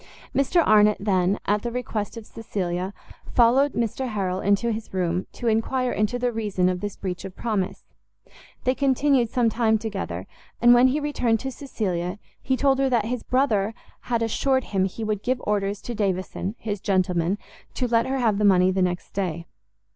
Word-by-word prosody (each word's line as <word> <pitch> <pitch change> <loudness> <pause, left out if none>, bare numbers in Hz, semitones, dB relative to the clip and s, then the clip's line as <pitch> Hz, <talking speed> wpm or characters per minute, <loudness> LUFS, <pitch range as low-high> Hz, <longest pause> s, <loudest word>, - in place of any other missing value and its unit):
Mr 310 +5 +3
Arnott 210 -1 +5
then, 190 -1 +1
at 205 +1 +1
the 240 - -3
request 230 -3 -3
of 225 - -8
Cecilia, 185 -5 -3 0.4
followed 255 +4 +4
Mr 235 +3 -1
Harrel 190 -5 -2
into 200 +4 +2
his 220 0 -5
room, 180 0 -1
to - - -8
enquire 240 +3 +1
into 215 +3 0
the 245 0 0
reason 205 -5 0
of 180 -1 -2
this 205 -1 -4
breach 185 -2 -4
of 190 -1 -8
promise; 210 -5 -2 0.8
they 255 - +2
continued 270 -2 +2
some 245 0 +2
time 220 0 +2
together, 195 - -4 0.3
and 240 0 +7
when 245 +1 +6
he 270 +4 +1
returned 250 -6 0
to 265 - -4
Cecilia, 190 -9 -3 0.2
he 260 - 0
told 270 -1 +2
her, 270 -1 +2
that 235 -4 +2
his 245 +1 -2
brother 225 -5 +1 0.3
had 235 -2 +1
assured 260 +4 +1
him 190 -4 0
he 195 +4 -5
would 210 -2 -1
give 255 +2 0
orders 200 -1 -1
to 240 - -4
Davison, 195 -1 -2
his 205 -3 -4
gentleman, 185 -1 +1 0.4
to 250 - 0
let 230 -1 +2
her 270 +1 -1
have 220 -5 +1
the - - +1
money 185 -2 +5
the 190 0 0
next 180 -1 -1
day. 170 -4 -3
215 Hz, 185 wpm, -24 LUFS, 190-245 Hz, 0.8 s, and